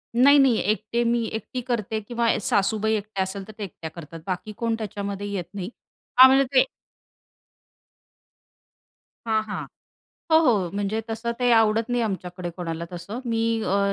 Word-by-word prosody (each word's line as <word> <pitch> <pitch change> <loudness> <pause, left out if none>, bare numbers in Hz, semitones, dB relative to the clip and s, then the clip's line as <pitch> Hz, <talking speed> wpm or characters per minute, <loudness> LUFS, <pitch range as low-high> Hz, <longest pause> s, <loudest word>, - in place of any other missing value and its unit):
नाही, 280 +4 +7
नाही, 265 -5 +5
एकटे 220 +2 -1
मी 235 0 +1
एकटी 235 +3 -4
करते 225 -3 -2
किंवा 235 -1 0
ए - - 0
सासूबाई 210 +2 +1
एकट्या 205 -2 -2
असेल, 190 +1 -5
तर 215 - -10
ते 210 - -5
एकट्या 165 -4 -7
करतात, 165 0 -10
बाकी 185 +4 -3
कोण 230 -1 0
त्याच्यामध्ये 205 -1 -4
येत 190 -3 -2
नाही. 190 -1 -5 0.5
हां, 260 +1 +11
म्हणजे 270 +1 +5
ते 260 - +8 2.6
हां, 220 -1 +2
हां. 215 -1 -5 0.7
हो, 320 - +8
हो, 210 - +2
म्हणजे 205 +2 -1
तसं 225 +1 -2
ते 245 -1 +2
आवडत 225 +1 +3
नाही 245 -1 +1
आमच्याकडे 180 -4 -4
कोणाला 170 -1 -5
तसं. 200 +8 -6
मी 230 -1 -1 0.2
अ, 200 0 +1
215 Hz, 160 wpm, -24 LUFS, 195-235 Hz, 2.6 s, हां